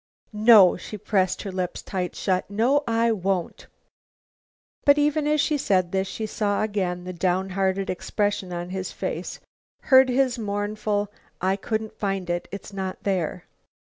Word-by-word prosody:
"No," 210 -3 +7
she 210 - -8
pressed 190 -2 0
her 195 - -5
lips 185 -1 -3
tight 180 -2 -3
shut, 185 -1 -1
"no, 245 +8 +2
I 230 0 +2
won't." 190 -4 -2 1.2
But 285 0 +6
even 295 0 +2
as 300 0 +2
she 300 0 +1
said 185 -7 +1
this, 190 0 0
she 220 +3 -4
saw 205 -1 -1
again 185 -4 -2
the 185 0 -6
downhearted 190 +2 0
expression 200 0 -2
on 175 +1 -5
his 190 0 -4
face, - - -5 0.5
heard 260 0 +8
his 255 -1 +1
mournful, 205 0 -2 0.3
"I 190 +1 +1
couldn't 220 +2 -4
find 195 -3 -2
it. 175 0 -3
It's 200 0 -8
not 190 -1 -5
there." 185 -6 -2
200 Hz, 150 wpm, -24 LUFS, 185-220 Hz, 1.2 s, heard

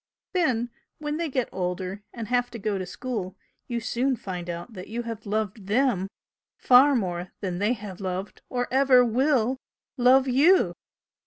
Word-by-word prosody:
Then 250 -10 +1 0.3
when 295 0 -3
they 335 -1 -2
get 255 -3 0
older 185 +2 -3
and 230 -2 -6
have 245 +1 +1
to - - -7
go 205 -2 -2
to 185 - -4
school 205 -5 -5 0.3
you 240 -2 -2
soon 255 +4 0
find 180 -5 -6
out 175 +6 -6
that 185 -2 -8
you 235 +2 -4
have 225 -2 -7
loved 210 -1 -2
THEM 215 -4 +2 0.5
far 265 +3 +6
more 180 -5 -2
than 180 -3 -3
they 210 +4 +2
have 205 -4 -8
loved 190 +1 -4
or 245 -1 -1
ever 260 -1 +5
WILL 255 +1 +2 0.4
love 260 +2 +5
YOU!" 295 +9 +4
230 Hz, 165 wpm, -26 LUFS, 190-255 Hz, 0.5 s, far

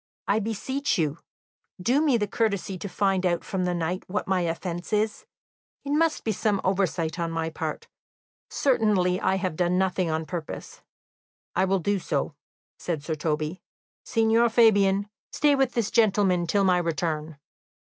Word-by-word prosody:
"I 205 +2 +3
beseech 245 +6 -1
you, 155 -2 -1 0.6
do 250 +10 +2
me 290 -6 +3
the 210 - 0
courtesy 200 -3 -1
to 195 +2 -6
find 195 -1 +1
out 175 -2 +1
from 185 -2 -2
the 180 0 0
knight 175 +2 -2
what 205 +3 -3
my 190 -1 +1
offence 170 +1 -3
is; 215 0 0 0.6
it 280 - -3
must 315 +1 +2
be 220 - 0
some 210 -1 0
oversight 185 -3 0
on 170 -1 -1
my 165 0 -2
part 155 -1 -5 0.6
certainly 210 -9 +2
I 190 - +2
have 185 -4 -2
done 180 +1 +1
nothing 185 -2 +1
on 160 0 -1
purpose." 170 -2 -7 0.7
"I 185 - +3
will 195 +1 +2
do 200 +3 0
so," 150 -3 -2 0.5
said 160 -5 -3
Sir 160 - -2
Toby. 155 +2 -2 0.4
"Signor 225 +1 +3
Fabian, 205 -3 +4 0.2
stay 295 -1 +3
with 270 -3 +1
this 225 -3 0
gentleman 195 -5 +3
till 200 +4 +2
my 180 -2 +4
return." 160 -2 -2
190 Hz, 160 wpm, -26 LUFS, 170-215 Hz, 0.7 s, Fabian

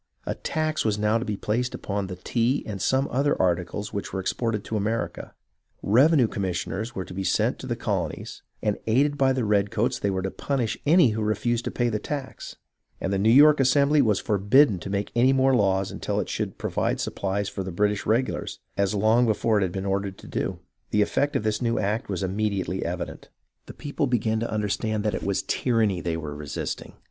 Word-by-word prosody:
A - - -1
tax 155 -1 -1
was 105 -2 +1
now 105 +2 +2
to 120 - -4
be 105 -4 -3
placed 120 +5 -1
upon 100 -1 -3
the 90 - -6
tea 120 +8 0
and 100 -3 -5
some 135 +1 +2
other 140 +3 +1
articles 90 +3 -1
which 100 - -4
were 95 - -3
exported 110 +2 -1
to 110 - -4
America; 110 +2 -2 0.5
revenue 130 +4 +5
commissioners 100 +4 -3
were 95 - -3
to - - -10
be 95 +1 -3
sent - - +1
to - - -7
the - - -1
colonies, - - -3 0.2
and 105 -1 0
aided 140 +6 +3
by 135 -2 +3
the 130 -3 0
redcoats 105 +4 +1
they 100 - 0
were 95 -1 -1
to 95 - -2
punish 130 -6 -1
any 165 -3 +6
who 110 0 -2
refused 110 +3 0
to - - -1
pay 120 - 0
the 110 -2 -1
tax; 140 0 -6 0.4
and 95 - -2
the 95 - +1
New 105 +3 +3
York 145 +5 +7
Assembly 140 +3 +4
was 110 -6 +2
forbidden 105 +2 +3
to 90 - -7
make 100 +1 -2
any 125 +3 +4
more 135 0 +3
laws 95 -3 +1
until - - -2
it - - -3
should - - -3
provide - - -1
supplies 100 +1 -2
for 100 - -4
the 95 0 -4
British 105 +3 0
regulars, 120 +4 0 0.2
as 100 +1 +1
long 110 +4 +3
before 110 0 +2
it - - -1
had 95 -2 0
been 95 +1 -4
ordered 100 0 -2
to - - -14
do. - - -2 0.3
The 105 0 +3
effect 145 +7 0
of - - +1
this 110 +1 -1
new 115 -1 +1
act 105 +2 -1
was 95 -2 -2
immediately 95 -1 -1
evident. - - -5 0.4
The - - -10
people 145 0 -2
began 110 -3 +1
to 115 - -2
understand 110 0 -1
that 105 -1 0
it - - -3
was 100 -1 -1
tyranny 110 -7 +1
they 85 -1 -2
were 75 -2 -5
resisting. 75 -2 -5
105 Hz, 210 wpm, -25 LUFS, 100-125 Hz, 0.5 s, York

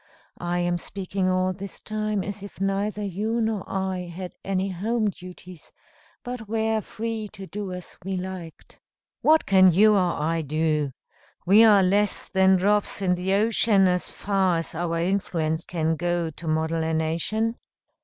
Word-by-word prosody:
I 175 0 -2
am 175 0 0
speaking 190 0 -3
all 185 0 +1
this 195 +1 -8
time 215 -2 -2
as 200 0 -6
if 200 -1 -10
neither 200 +2 -1
you 210 +4 -2
nor 220 -3 -1
I 190 -2 -2
had 180 +1 -6
any 195 0 -1
home 215 +4 0
duties, 180 -2 -12 0.5
but 245 -4 -6
were 220 0 0
free 220 0 -4
to 195 -2 -8
do 200 0 -5
as 180 -1 -8
we 190 0 -3
liked." 180 -3 -8 0.4
"What 315 +1 +4
can 190 -2 +6
you 210 +5 +5
or 180 -5 +1
I 165 +2 0
do? 155 -1 0 0.5
We 205 +5 +7
are 205 -3 +6
less 200 +3 +1
than 190 -1 +4
drops 205 +1 +1
in 180 -1 +3
the 185 +2 0
ocean, 210 -2 +3
as 180 0 0
far 190 -3 +1
as 165 - -4
our 165 0 -2
influence 165 -3 -1
can 160 -2 -1
go 175 0 -1
to 165 +2 -10
model 160 +1 0
a 160 0 0
nation?" 170 +9 -1
190 Hz, 165 wpm, -25 LUFS, 175-210 Hz, 0.5 s, We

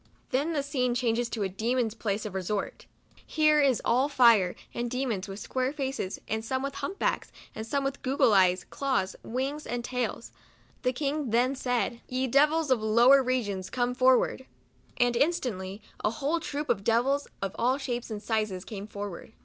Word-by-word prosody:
Then 290 +6 +1
the 285 -3 0
scene 250 -3 0
changes 240 -1 0
to 220 -4 -2
a - - +1
demon's 225 +4 -1
place 215 -2 -2
of 210 - -5
resort. 195 +2 -3 0.4
Here 305 -1 +3 0.2
all 255 +4 +3
is - - -12
fire 230 -9 +5 0.2
and 240 0 -2
demons, 235 -6 -2
with 195 0 -7
square 255 +4 -2
faces, 270 -9 -3
and 220 +1 -2
some 260 +3 -2
with 275 0 -3
hump 385 +7 -5
backs - - -1 0.2
and 220 +1 -7
gog 275 -1 -1
gle 260 -4 +3
eyes, 185 -2 +4
claws, 260 -9 -1
wings, 270 +5 -3
and 240 0 -3
tails. 245 -2 -3 0.5
The 250 - +1
king 285 +1 -2
then 245 +4 +2
said, 245 -2 -1
" - - -36
Ye 255 +1 0
devils 295 +3 +3
of 245 -4 +3
lower 235 +5 +6
re 255 -2 0
gions, 190 -2 -5
come 245 -1 0
forward! 260 0 +3 0.2
" - - -34
And 245 -1 +3
instantly 225 - -1 0.2
a - - +3
whole 285 +9 -1
troop 295 -2 -4
of 210 -5 +1
devils, 250 +6 +2
of 195 -1 -4
all 255 +3 +2
shapes 245 -4 -4
and 215 -1 -5
sizes, 215 -4 -1
came 205 -2 -7
forward. 205 -2 -7
245 Hz, 185 wpm, -28 LUFS, 215-275 Hz, 0.5 s, lower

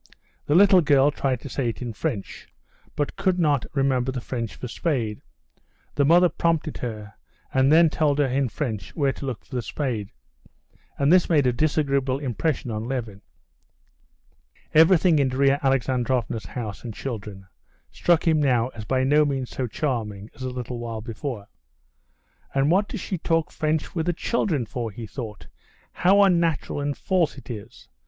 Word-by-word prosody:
The 145 - +2
little 195 0 +7
girl 145 -2 +4
tried 130 -4 -1
to - - -8
say 125 -2 -1
it 115 - -6
in 120 -3 -5
French, 110 -3 -5 0.5
but 145 - -2
could 185 -1 +1
not 150 -6 +1
remember 130 -2 +1
the 130 - -4
French 115 -2 -4
for 125 - -6
spade; 115 -5 -2 0.7
the 145 - +2
mother 175 +5 +6
prompted 165 -2 -1
her, 110 -3 -6 0.4
and 130 +1 +4
then 165 +1 +7
told 150 -2 +1
her 145 - +3
in 135 0 0
French 110 - -4
where 140 -3 +1
to 140 - -7
look 125 -4 -5
for - - -17
the 125 - -1
spade. 115 -4 -3 0.9
And 140 +4 +3
this 185 -1 +4
made 150 -5 +3
a 125 - +3
disagreeable 140 -1 +1
impression 135 -1 -2
on 110 +1 -3
Levin. 115 -6 -4 1.5
Everything 165 0 +5
in 135 -2 +2
Darya 135 +2 +2
Alexandrovna's 125 -4 0
house 110 -5 -6
and 115 -4 -6
children 105 -6 -6 0.5
struck 175 -1 +2
him 155 -2 +4
now 125 -4 +2
as 110 -4 -9
by 130 +2 +1
no 145 +3 +4
means 135 -4 -2
so 130 - -3
charming 110 -6 -3
as - - -15
a 130 - -2
little 125 -1 -5
while 115 -2 -5
before. 115 -1 -6 1.1
"And 140 +3 +3
what 200 +3 +3
does - - -6
she 185 - -4
talk 165 -1 0
French 155 -1 -1
with 165 -1 -2
the 175 - +2
children 165 - -1
for?" 115 +1 -4
he 110 +2 -8
thought; 110 -3 -7 0.5
"how 195 +3 +4
unnatural 170 -6 +1
and 145 0 -2
false 180 -6 0
it 130 -2 -9
is! 110 0 -10
135 Hz, 170 wpm, -24 LUFS, 120-155 Hz, 1.5 s, little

